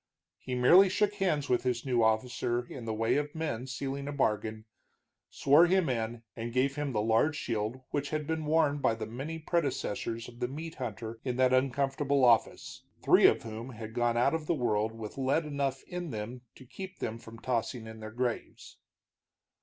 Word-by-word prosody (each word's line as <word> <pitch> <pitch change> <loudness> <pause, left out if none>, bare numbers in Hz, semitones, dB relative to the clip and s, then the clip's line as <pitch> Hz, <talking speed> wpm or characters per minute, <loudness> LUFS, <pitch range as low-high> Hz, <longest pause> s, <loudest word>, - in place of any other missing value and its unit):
He 130 - -4
merely 175 +11 +7
shook 205 +2 +1
hands 175 -8 0
with 125 - +2
his 125 -1 -1
new 125 -3 +2
officer 120 +2 0
in 120 -1 -8
the 110 - -2
way 115 +4 +1
of 145 +1 -3
men 145 -6 -3
sealing 135 +1 -4
a - - -2
bargain, 110 -5 -1 0.6
swore 150 +5 +5
him 185 -3 +2
in, 115 -1 -2
and 115 +1 -5
gave 130 +3 +1
him 145 -2 -2
the 105 -3 0
large 115 +8 +3
shield 115 +1 -2
which 145 0 -1
had 155 -1 -2
been 160 0 -2
worn 150 -2 +3
by 115 - +2
the 110 -1 -5
many 135 +9 -5
predecessors 135 -8 -2
of 120 0 -13
the 125 - 0
meat 160 +5 -6
hunter 115 -3 -6
in 125 -2 -2
that 130 0 +3
uncomfortable 135 +1 +2
office, 115 -3 +2 0.2
three - - +7
of - - +2
whom 115 +3 -7
had 110 -1 -8
gone 120 0 +1
out 125 +5 +3
of 160 -2 -2
the 170 - +2
world 110 -5 0
with 115 +2 -8
lead 135 +5 +1
enough 140 -3 -2
in 175 -2 -5
them 115 +1 -5
to 130 - -14
keep 190 +8 -8
them 115 0 -4
from 115 0 -12
tossing 120 -1 -2
in 110 0 -9
their 110 0 -7
graves. 120 +1 -4
125 Hz, 195 wpm, -30 LUFS, 115-145 Hz, 0.6 s, merely